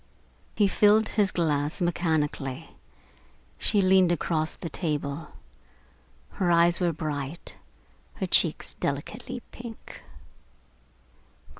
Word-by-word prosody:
He 205 - +4
filled 210 +2 +4
his 205 -3 +1
glass 150 -2 0
mechanically. 160 -6 -1 0.9
She 205 - +2
leaned 185 -1 +5
across 160 -1 -1
the - - -6
table. 150 -2 -3 1.0
Her 185 -3 -1
eyes 170 0 +4
were 175 -2 +2
bright, 150 0 -5 0.6
her - - -2
cheeks - - +2
delicately - - -4
pink. 235 -2 -10
170 Hz, 95 wpm, -27 LUFS, 150-185 Hz, 1.0 s, leaned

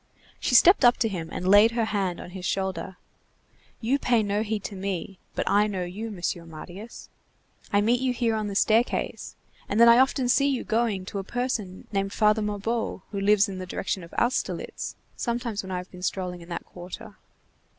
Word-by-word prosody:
She 250 - +1
stepped 345 - +7
up 245 0 +6
to 225 - +1
him, 170 -6 -4
and 180 - -3
laid 205 +4 +7
her 230 -1 +1
hand 195 -5 -1
on 175 - -9
his 185 0 -8
shoulder: 190 -1 -2 0.8
"You 255 +5 +1
pay 240 -4 +2
no 205 +1 0
heed 215 -2 -2
to 205 - -5
me, 190 0 -4 0.2
but - - -2
I 205 +1 +4
know 190 -3 -2
you, 200 +6 -5
Mr. 175 -4 -3
Marius. 175 +7 -10 0.6
I 205 - +4
meet 240 +4 +2
you 260 -1 +1
here 235 -2 0
on 215 -1 -1
the 200 - -5
staircase, 225 +4 +1 0.3
and 205 - 0
then 235 - +8
I 235 +1 +8
often 265 -1 +3
see 275 +3 +4
you 265 -3 -1
going 220 -4 0
to 200 - -4
a - - -4
person 220 -4 -3
named 195 -1 -1
Father 215 0 +3
Mabeuf 210 0 -2
who 200 - -3
lives 205 0 +4
in 190 -2 -6
the 185 - -6
direction 185 +1 -3
of 170 - -12
Austerlitz, 240 +2 -1 0.2
sometimes 235 -3 -2
when 190 - -8
I 185 - -1
have 180 +1 -7
been 180 - -11
strolling 180 -1 -3
in 170 - -13
that 170 - -5
quarter. 190 +5 -10
205 Hz, 200 wpm, -26 LUFS, 185-230 Hz, 0.8 s, then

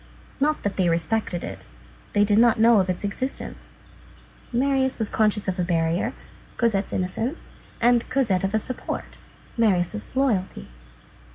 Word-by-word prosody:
Not 300 +2 +1
that 205 - -2
they 185 -3 +3
respected 170 +2 0
it; - - -8 0.5
they 205 0 +4
did 205 +1 +3
not 235 -1 +4
know 230 -1 +6
of 190 -1 0
its 180 - -2
existence. 255 +7 -4 0.8
Marius 265 +1 +1
was 220 -2 -2
conscious 210 -2 +1
of 190 0 -2
a - - +2
barrier, 170 0 0 0.4
Cosette's 210 -5 +1
innocence; 225 - -3 0.3
and 240 0 +3
Cosette 240 -9 +1
of 195 +2 0
a - - +5
support, 255 +4 -5 0.4
Marius' 210 0 0
loyalty. 200 - 0
210 Hz, 145 wpm, -24 LUFS, 185-240 Hz, 0.8 s, know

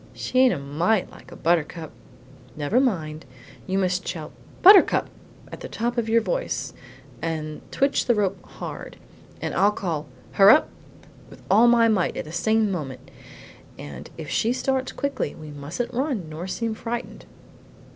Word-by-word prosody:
She 255 - -1
ain't 260 -1 +6
a - - -1
mite 165 +9 0
like - - -15
a - - -9
buttercup." 165 -1 0 0.6
"Never 150 +11 +1
mind; 160 - -1 0.4
you 190 0 0
must 185 -1 0
shout 160 -3 -5 0.3
'Buttercup!' 390 +1 +7 0.4
at - - -8
the - - -8
top 240 +2 -2
of 230 -2 -1
your 230 +1 +4
voice, - - -2 0.5
and 155 -2 -4
twitch 275 +1 +1
the 240 - +4
rope 195 -2 -1
HARD; - - -8 0.4
then - - -3
I'll 200 +2 +4
call, 165 -7 -3 0.2
'Hurrap!' 205 +10 +6 0.6
with - - -15
all 220 +5 +6
my 235 -1 +5
might 205 -5 +1
at - - -4
the 155 - -9
same 220 +4 +1
moment. 140 -8 -6 0.7
And 70 -3 -9
if - - -7
she 230 +2 +1
starts 260 0 -1
quickly 280 0 -3
we 155 -1 -10
mustn't 145 +11 -5
run 250 - -1
nor 160 +4 -6
seem 225 +4 -2
frightened!" 235 +2 -6
195 Hz, 155 wpm, -24 LUFS, 160-240 Hz, 0.7 s, Buttercup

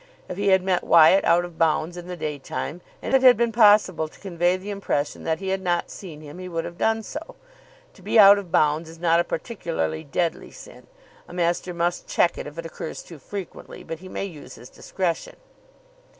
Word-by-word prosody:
If 180 - -6
he 200 +2 -2
had 190 -1 +4
met 185 -1 0
Wyatt 170 +4 +6
out 175 +1 +3
of 175 -2 -12
bounds 165 +1 +1
in 175 0 -9
the 180 -1 -6
day 150 -2 -4
time, 155 +5 -5 0.2
and - - -3
it 265 - +5
had 250 -3 +7
been 235 0 +1
possible 205 -7 +4
to - - -19
convey 175 -1 0
the 195 +2 -7
impression 195 -7 -3
that 160 0 0
he 190 -1 -4
had 190 0 -1
not 175 -2 -1
seen 160 -6 -10
him, 150 +3 -11
he 185 0 -7
would 165 -1 -3
have 170 - -9
done 225 0 +1
so. 305 +8 -8 0.6
To - - -19
be - - 0
out 200 -1 +9
of 185 -4 -10
bounds 155 +1 +2
is 165 - -12
not 165 0 +2
a - - +3
particularly 165 - -3
deadly 165 +4 -2
sin. - - -14 0.4
A - - -12
master 175 +1 -1
must 175 0 -2
check 170 - +2
it - - -6
if 145 +2 -11
it 165 - -6
occurs 165 0 -7
too 165 -4 -12
frequently, 195 +6 -8
but 165 - -7
he 185 +1 -11
may 195 - -4
use 165 -7 -10
his 120 +2 -14
discretion. 175 -4 -3
175 Hz, 220 wpm, -24 LUFS, 165-195 Hz, 0.6 s, out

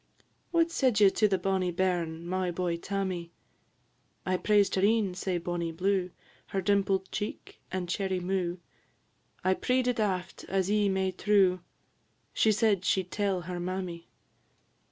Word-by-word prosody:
"What 335 -1 +2
said 255 -9 +2
ye 200 -2 +7
to 215 - +3
the 195 -2 +1
bonnie 185 0 0
bairn, 170 -2 -1
My 185 +1 -1
boy, 175 0 -1
Tammy?" 185 -2 -3 1.0
"I 185 - +1
praised 205 +1 +3
her 190 - +1
een, 205 -2 +3
sae 185 0 -2
bonny 170 -1 -3
blue, 185 +2 0 0.4
Her 195 - -2
dimpled 195 -1 +1
cheek, 210 0 -5
and 185 -1 -2
cherry 190 +1 -1
mou'; 180 -1 -1 0.9
I 185 - +3
pree'd 250 +5 0
it 250 -1 0
aft, 190 -3 -2
as 195 0 0
ye 210 -1 +3
may 190 -1 0
true; 190 -1 +3 0.7
She 220 - +3
said 210 -3 +2
she 190 +1 +2
'd 180 - -23
tell 200 -4 0
her 175 +1 -5
mammy. 180 -1 -4
190 Hz, 155 wpm, -29 LUFS, 180-200 Hz, 1.0 s, ye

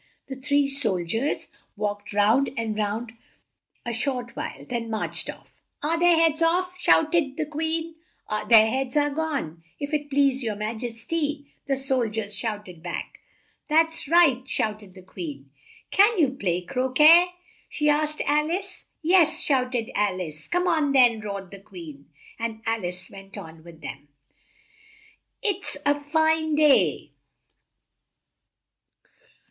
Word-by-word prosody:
The 265 - -4
three 285 +2 +1
sol 275 -9 +1
diers 225 - -2 0.3
walked 205 0 -3
round 215 +7 +3
and 225 -2 -2
looked 210 -1 0
for 225 +3 -4
them 230 0 -16 0.7
a 240 - -3
short 245 0 -3
while, - - -6
then 235 -2 -3
marched 220 -1 -3
off. - - -11 0.2
"Are 325 +2 0
their 350 0 +5
heads 325 -1 +3
off?" 360 +2 +1
shout 320 -3 +3
ed 290 -5 +1
the 310 - -1
Queen. 320 +2 -3 0.6
"Their 220 -2 +8
heads 260 +4 -1
are 290 0 +2
gone, 280 - -3 0.2
if 285 +1 -5
it 295 -1 -1
please 275 -1 +2
your 220 -4 -2
ma 210 +1 -3
jes 230 0 -5
ty," 295 -3 -2 0.2
the 275 - +1
sol 265 -3 0
diers 210 -1 -4
shouted 205 -5 -5
back. 175 0 -6 0.5
"That's 325 0 +2
right!" 320 -6 +5
shouted 210 -6 -3
the 185 - -13
Queen. 145 -7 -8 0.4
"Can 415 +3 +5
you 305 -6 +4
play 180 -9 -1
cro 255 +6 -2
quet?" 320 +6 +7 0.4
she 300 - -1
asked 300 +1 +2
Al 300 +2 +2
ice. 380 +2 -4 0.2
"Yes," 330 -1 +4
shouted 255 -7 0
Al 200 -3 0
ice. 155 -4 -6
"Come 355 +1 0
on 310 -5 +2
then!" 245 -4 +5
roared 200 -3 -6
the 200 - -10
Queen, 165 -8 -12 0.3
and 225 -1 -4
Al 225 -2 -1
ice 180 0 -5
went 195 0 -11
on 160 0 -10
with 165 -1 -14
them. 145 0 -8 1.4
"It's 400 -3 0
it's - - -7
a 290 - +5
fine 315 +1 +1
day!" 300 -2 +3
260 Hz, 155 wpm, -25 LUFS, 210-305 Hz, 1.4 s, Their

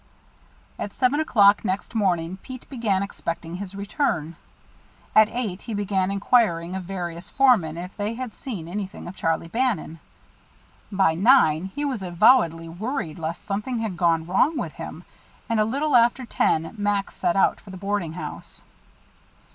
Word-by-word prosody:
At 205 - -4
seven 270 +3 +2
o'clock 205 -9 +5
next 195 +1 -2
morning 185 -5 0
Pete 255 +5 -9
began 215 -7 0
expecting 170 -3 -5
his 195 0 -7
return. 195 - -1 0.8
At 215 0 +7
eight 220 -6 -3
he 225 - -5
began 195 -2 0
inquiring 195 -4 +2
of 190 -1 -5
various 175 -2 -5
foremen 220 - +3
if 180 +2 -7
they 210 +2 -3
had 250 -2 -5
seen 205 - -6
anything 195 +2 -5
of 180 - -8
Charlie 165 -1 -1
Bannon. 225 -6 -1 0.9
By 190 -4 +3
nine 175 - +4
he 290 +10 -4
was 260 -7 -2
avowedly 175 -2 +3
worried 175 - -4
lest 165 +3 -5
something 210 +5 -2
had 220 -5 -3
gone 165 -2 +2
wrong 255 - +2
with - - -3
him, - - -8 0.4
and 230 -3 +1
a 215 - +4
little 280 +6 0
after 240 +2 +4
ten 165 -7 0
Max 205 -1 -1
set 170 - 0
out 195 - +3
for 205 - -15
the 190 - -8
boarding 195 -4 -2
house. 180 - -8
200 Hz, 155 wpm, -24 LUFS, 175-230 Hz, 0.9 s, At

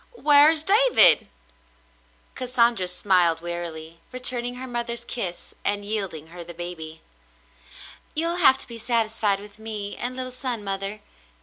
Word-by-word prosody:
"Whar's 300 -4 +5
David 400 - +6
.^'; - - -24 1.1
Cassandra 240 -6 +1
smiled 180 -3 +2
wearily, 170 -1 -6
returning 250 -1 -1
her 255 +1 -7
mother's 235 -1 -3
kiss 185 -9 -5
and 205 0 -1
yielding 195 -7 -3
her 175 +1 -9
the 170 0 -10
baby. 160 -2 -7 1.1
"You'll 335 +2 0
have 265 -6 +6
to - - -4
be 235 -1 -9
satisfied 220 -3 0
with 205 +1 -14
me 210 -2 -6
and 250 +1 -4
little 255 0 -5
son, 250 -3 -3
mother. 195 +1 -3
215 Hz, 135 wpm, -24 LUFS, 180-250 Hz, 1.1 s, David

